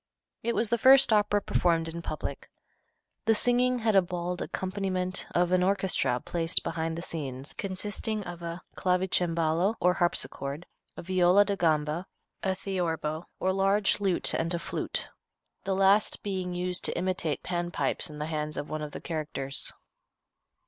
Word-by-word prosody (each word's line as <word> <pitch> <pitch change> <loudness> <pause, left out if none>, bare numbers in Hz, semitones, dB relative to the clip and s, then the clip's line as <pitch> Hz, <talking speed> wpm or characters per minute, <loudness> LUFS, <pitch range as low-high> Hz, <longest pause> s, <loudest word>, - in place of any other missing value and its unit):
It 235 0 -1
was 225 - +1
the 235 - +1
first 265 -1 +7
opera 205 -1 +3
performed 165 -2 +1
in 165 +1 -5
public. - - -5 0.8
The 225 - +4
singing 245 +2 +3
had 220 -3 +1
a 195 - +7
bald 180 0 -4
accompaniment 185 -1 -1
of 175 0 +1
an 185 0 +4
orchestra 190 -9 +1
placed 165 +4 0
behind 165 0 -2
the 170 - -4
scenes 140 -5 -5
and - - -15
consisting 205 +2 -2
of 175 -2 -8
a 170 +1 -6
clavicembalo, 180 0 +1
or 180 0 +4
harpsichord, 165 -3 0 0.3
a - - -6
viola 185 +2 +4
da 200 0 0
gamba, 160 0 0 0.3
a 190 -1 0
theorbo, 170 -4 -2
or 190 0 +1
large 195 +2 +3
lute, 195 -3 +2
and 165 +1 0
a - - 0
flute, - - -2 0.6
the 195 -1 0
last 195 +2 +3
being 185 -3 -3
used 180 0 -2
to - - 0
imitate 180 -4 -1
Pan 175 -1 -2
pipes 150 +1 0
in 150 - -9
the 150 - -3
hands 155 -1 -3
of 145 - -5
one 155 0 -3
of 150 -1 -6
the - - -6
characters. 145 -4 -2
180 Hz, 160 wpm, -28 LUFS, 165-195 Hz, 0.8 s, first